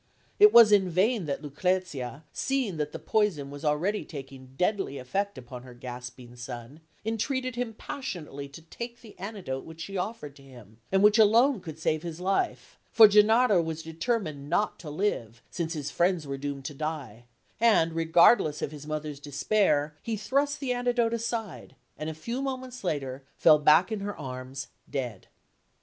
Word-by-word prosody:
It 420 +1 +9
was 230 -3 +9
in 195 -3 +4
vain 190 +2 +1
that 140 +2 -3
Lucrezia, 150 -3 -2
seeing 260 -10 -1
that 150 -1 -2
the - - -5
poison 180 -11 0
was 145 +1 -9
already 165 +8 0
taking 135 -3 -10
deadly 190 -6 0
effect 195 +9 -2
upon 125 -1 -9
her 125 -1 -13
gasping 125 0 -9
son, 120 +3 -8 0.3
entreated 255 +3 -1
him 240 -2 -3
passionately 170 - -6
to 150 +4 -12
take 235 +8 -8
the 220 -3 -14
antidote 185 -10 -5
which 160 0 -12
she 195 +4 -5
offered 180 -7 -4
to - - -16
him, 120 -5 -15
and 195 +1 +3
which 210 +2 +6
alone 230 +4 +5
could 160 -3 -8
save 155 -1 0
his 170 -1 -6
life; 195 - -1
for 220 -2 +9
Gennaro 210 -1 +5
was 160 -1 -4
determined 160 - -3
not 210 - 0
to 160 - -8
live 120 - -2
since 170 -2 -3
his 150 -3 -4
friends 175 -2 +1
were 140 -1 -4
doomed 140 -1 -5
to 145 - -4
die, 140 -7 -5 0.3
and, 215 -8 +4
regardless 165 0 +4
of - - -2
his 150 -1 -10
mother's 155 -2 -4
despair, 150 0 +1
he 225 -2 -3
thrust 280 +7 0
the 260 -3 -1
antidote 245 -1 +1
aside, 230 -4 -4 0.2
and 155 - -5
a 160 - -6
few 235 - -4
moments 260 -3 -5
later 135 -6 -3
fell 155 -2 +6
back 155 +7 +5
in 215 - -2
her 205 +1 -5
arms, 130 0 -7 0.2
dead. 125 -8 -4
165 Hz, 170 wpm, -28 LUFS, 140-215 Hz, 0.3 s, It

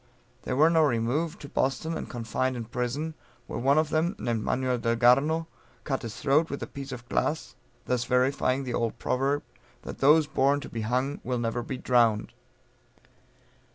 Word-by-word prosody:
They - - -3
were 155 +5 +5
now 160 -1 +4
removed 130 +6 0
to 145 - -8
Boston 150 +6 -1
and - - -5
confined 125 +2 -2
in 120 -2 -5
prison, 125 +7 -3 0.3
where - - -5
one 140 +4 +3
of 155 0 +2
them, 165 +5 +1
named 115 -2 -2
Manuel 125 0 0
Delgarno 125 +8 +3 0.4
cut 135 -3 -2
his 115 -3 -7
throat 150 +4 +2
with 140 - -4
a - - -2
piece 140 -1 -8
of 125 -1 -8
glass, 155 +1 -1 0.3
thus 125 -1 0
verifying 130 +1 +1
the 125 -2 -4
old 115 -2 -1
proverb, 140 +3 0 0.4
_that - - -7
those 150 +3 +6
born 140 -1 +2
to - - -8
be 115 - -4
hung, 130 +6 -1
will 125 0 -1
never 120 0 -1
be 130 +2 -5
drown'd! 115 -4 +2
130 Hz, 175 wpm, -27 LUFS, 120-145 Hz, 0.4 s, those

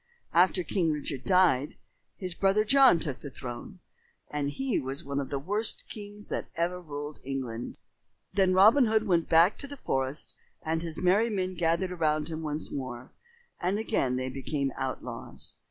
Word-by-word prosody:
After 180 +1 +4
King 170 -1 +1
Richard 145 -3 -3
died, 180 -8 +3 0.4
his 185 -2 -4
brother 195 +4 +3
John 265 -3 +6
took 145 -6 -3
the 145 - -7
throne, 130 +9 -8 0.5
and 145 -1 -1
he 265 - -1
was 135 +1 -4
one 140 0 -2
of 140 - -4
the 140 - -1
worst 205 +10 0
kings 205 -1 -8
that - - -3
ever 175 +2 -1
ruled 145 -2 -6
England. 130 -3 -4 0.6
Then 190 -2 +3
Robin 225 +7 +7
Hood 220 0 +2
went 170 -5 +2
back 165 +4 +5
to 280 - -3
the 285 +1 -8
forest 135 - -2 0.3
and 160 +1 -1
his 165 0 -4
merry 200 +6 +4
men 185 -3 -1
gathered 175 +2 +1
around 155 -3 0
him 160 0 -4
once 150 0 -3
more, 130 -2 -6 0.5
and 185 +3 0
again 210 - 0
they 130 0 -2
became 135 +1 -2
outlaws. 130 -1 -5
165 Hz, 170 wpm, -29 LUFS, 140-195 Hz, 0.6 s, Robin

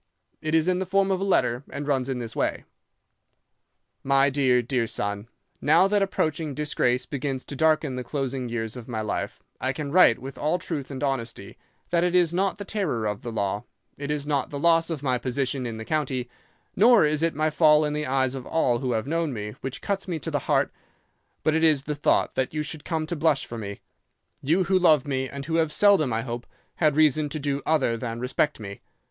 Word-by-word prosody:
It 155 0 0
is 160 +1 +3
in 185 0 +2
the 190 - -3
form 195 +1 +2
of 190 0 0
a - - 0
letter, 125 -11 +2
and 145 0 -6
runs 135 -2 0
in 130 - -1
this 115 -2 -6
way: - - -1 1.4
"'My 135 +1 +3
dear, 130 -3 +3
dear 125 -1 0
son,—Now 105 - 0
that 205 0 +2
approaching 155 -6 -1
disgrace 125 -4 0
begins 135 -2 -4
to 140 - -6
darken 155 -1 +2
the 125 - -3
closing 135 -2 -3
years 115 -1 -3
of 120 -2 -9
my 115 -3 -3
life, 105 - -4 0.2
I 130 - -1
can 140 0 -5
write 170 -9 +6
with 135 +2 -9
all 155 +4 +1
truth 160 -6 -5
and 135 0 -5
honesty 115 -7 -3 0.4
that 170 0 +3
it 180 0 +1
is 175 -2 +3
not 195 +3 0
the 205 - -7
terror 180 - -2
of 105 -1 -2
the 120 - -5
law, 100 0 -2 0.3
it 140 0 -6
is 150 -1 -2
not 145 -2 0
the 145 - -5
loss 165 +2 +3
of 155 -4 -4
my 130 -3 +1
position 130 +1 -2
in 115 -1 -5
the 110 - -7
county, 135 -5 -1 0.5
nor 225 -2 +6
is 150 0 +1
it 165 -2 +1
my 155 +1 +1
fall 155 -1 +5
in 150 - -2
the 150 -1 -2
eyes 130 0 +1
of 130 -2 -7
all 125 -7 +1
who 130 -2 -1
have 110 0 -1
known 165 +1 -1
me, 105 -3 -5
which 135 0 -6
cuts 195 -1 -2
me 175 -3 -2
to 155 - -5
the - - 0
heart; - - +2 0.7
but 155 - +2
it 160 - +1
is 155 -4 +4
the 150 - -3
thought 145 - +1
that 130 +3 -2
you 150 - 0
should 150 0 -6
come 160 -2 -2
to 170 - -3
blush 155 -3 +1
for 115 - -7
me—you 135 - -4
who 185 +1 +2
love 155 -6 +4
me 130 -2 -2
and 140 -1 -7
who 165 +1 0
have 160 -2 +1
seldom, 195 -8 +4
I 115 0 -1
hope, 120 -1 -6 0.3
had 155 -3 +2
reason 155 -1 +3
to 155 - -4
do 140 0 -2
other 145 -7 +2
than 115 -1 -4
respect 130 +4 0
me. 100 -2 -8
140 Hz, 220 wpm, -25 LUFS, 125-160 Hz, 1.4 s, write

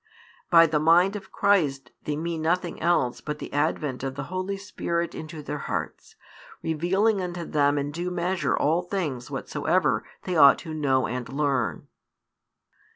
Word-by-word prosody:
By 165 -1 +8
the 155 -1 +1
Mind 175 +6 +4
of 205 - -8
Christ 165 -10 +1
they 150 - -1
mean 165 +1 -3
nothing 175 +2 -1
else 160 -8 +1
but 150 0 -4
the - - -8
advent 145 -2 -1
of 135 0 -4
the 145 - -4
Holy 185 +2 -2
Spirit 170 -4 -3
into 155 -1 -8
their 145 0 -4
hearts, - - -5 0.5
revealing 190 +6 +1
unto 175 -1 -4
them 145 -1 +2
in 145 0 -2
due 175 +4 -3
measure 175 -6 0
all 160 +4 +2
things 165 -10 -3
whatsoever - - 0 0.2
they 180 - -2
ought 140 -3 +8
to 160 - -7
know 135 -4 +1
and 125 -1 -4
learn. 135 - -1
160 Hz, 155 wpm, -26 LUFS, 145-175 Hz, 0.5 s, By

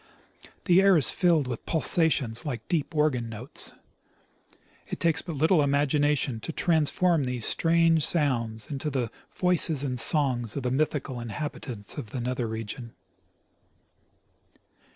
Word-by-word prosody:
The 180 -1 +5
air 195 -2 +5
is 140 - +2
filled 170 -5 +2
with 120 -3 -5
pulsations 150 -6 +1
like 125 -8 -5
deep 160 -1 -2
organ 135 -6 0
notes. 115 +4 -1 1.1
It - - -6
takes 165 -1 +1
but 170 -3 -7
little 160 +3 +3
imagination 145 -2 +1
to 110 - -6
transform 165 -1 +1
these 125 -3 -3
strange 165 -1 +3
sounds 120 -10 -1
into 145 +2 -3
the 125 -5 -2 0.2
voices 170 -5 +3
and 125 -3 -3
songs 125 -6 +3
of 140 - -4
the 125 - -1
my 145 +4 +3
thical 130 -5 -6
inhabitants 120 -3 -6
of 125 -8 -6
the 125 - -5
nether 125 0 -2
regions. 110 +2 -7
140 Hz, 135 wpm, -26 LUFS, 120-160 Hz, 1.1 s, The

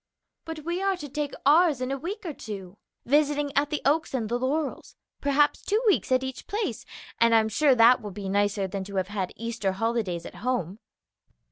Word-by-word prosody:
"But 325 -1 -6
we 345 +2 -2
are 390 -1 +1
to 295 - -7
take 290 +1 -3
ours 305 -1 +5
in 255 +1 -2
a 275 - -1
week 385 - -6
or 325 - -3
two, 200 -5 -8 0.3
visiting 290 +1 +2
at 285 +1 +2
the 300 - -3
Oaks 295 0 +1
and 225 -4 -2
the 240 +1 0
Laurels, 280 +3 -2 0.3
perhaps 285 +1 +2
two 420 +2 +1
weeks 405 -10 +2
at 255 0 +3
each 260 -1 -6
place, 285 - -3 0.3
and 230 0 +5
I'm 220 -1 +4
sure 270 +4 +4
that 235 +2 +6
will 210 - -6
be 195 0 -7
nicer 200 0 +1
than 195 0 -4
to 200 0 -8
have 190 0 -1
had 195 -3 -3
Easter 230 -4 -2
holidays 205 -5 -1
at - - -9
home." 220 -6 -2
255 Hz, 205 wpm, -26 LUFS, 210-295 Hz, 0.3 s, that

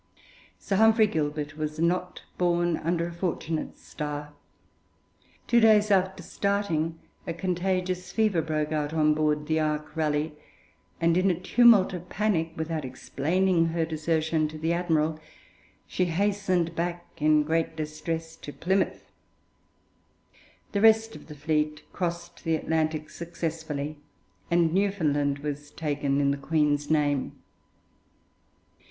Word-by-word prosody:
Sir 195 - -2
Humphrey 220 +1 +6
Gilbert 150 -4 -2
was 155 0 -3
not 180 +2 0 0.2
born 175 -1 +2
under 170 +1 -1
a 170 - -6
fortunate 165 -2 -3
star. 150 0 -6 1.1
Two 235 - +4
days 215 -2 +5
after 190 -1 +2
starting, 185 -6 -1 0.3
a 165 - -3
contagious 185 0 -1
fever 215 -6 +2
broke 155 -1 -2
out 150 0 -1
on 155 -1 +4
board 150 -1 0
the 160 +1 +1
'Ark 150 -1 -2
Raleigh,' 155 -1 0 0.7
and 165 0 +3
in 185 +1 +3
a 175 -2 0
tumult 210 0 +5
of 180 0 -7
panic, 180 -6 0
without 160 -1 -3
explaining 165 +7 0
her 165 0 0
desertion 160 0 0
to 155 +1 -8
the 160 +2 0
admiral, 160 -3 0 0.7
she 185 - 0
hastened 185 -1 0
back 175 +1 -2 0.2
in 150 0 +4
great 160 +1 0
distress 160 +1 -4
to 145 - -8
Plymouth. 190 +5 -1 1.6
The 200 - 0
rest 225 0 +5
of - - -12
the 150 - -9
fleet 150 0 -1
crossed 170 -1 -4
the 165 -1 +1
Atlantic 155 -1 -1
successfully, 160 -3 -4 0.5
and 170 -1 +3
Newfoundland 155 -8 +1
was 145 0 -4
taken 145 -3 -1
in 140 -1 +3
the 140 - -1
Queen's 145 0 +1
name. 145 -3 +1
165 Hz, 130 wpm, -27 LUFS, 150-180 Hz, 1.6 s, Humphrey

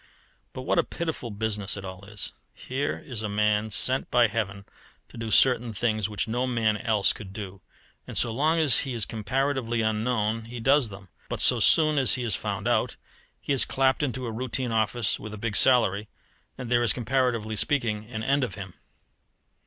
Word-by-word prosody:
But - - -7
what - - +1
a - - +3
pitiful 160 -7 -5
business 105 -2 -2
it 100 - -7
all 95 +1 -9
is! 105 0 -6 0.2
Here 135 +3 -3
is 120 -6 -5
a 105 - -3
man 105 +1 +1
sent 130 +7 +2
by 120 -1 +4
Heaven 100 -2 -3 0.4
to - - -16
do 115 -1 -5
certain 120 0 +4
things 110 -1 -1
which 100 -6 -3
no 120 +3 -1
man 115 -4 +1
else 105 -2 +2
could 95 -3 -10
do, 100 -2 -8 0.5
and - - -4
so 115 - +2
long 155 +7 +1
as 150 -7 +4
he 135 -3 -3
is 110 -4 +1
comparatively 120 +1 -1
unknown 110 0 -1
he 120 +1 -8
does 135 0 +3
them; 95 -2 -12 0.2
but - - -4
so - - +5
soon 155 -2 +5
as 130 - +5
he 125 - -4
is 115 -5 0
found - - -4
out, - - +1 0.4
he - - -2
is 135 - +5
clapped 130 +1 +1
into 130 -3 -2
a 115 - -4
routine 125 +1 -2
office 110 0 0
with 105 0 -8
a - - -9
big 105 0 -3
salary: 105 -5 +3 0.5
and 125 -2 -7
there 120 0 +3
is, 120 - +3
comparatively 120 -3 -1
speaking, 110 -4 -1
an 110 -2 -5
end 140 +3 +1
of 125 - -3
him. 95 -3 -8
115 Hz, 195 wpm, -26 LUFS, 105-130 Hz, 0.5 s, so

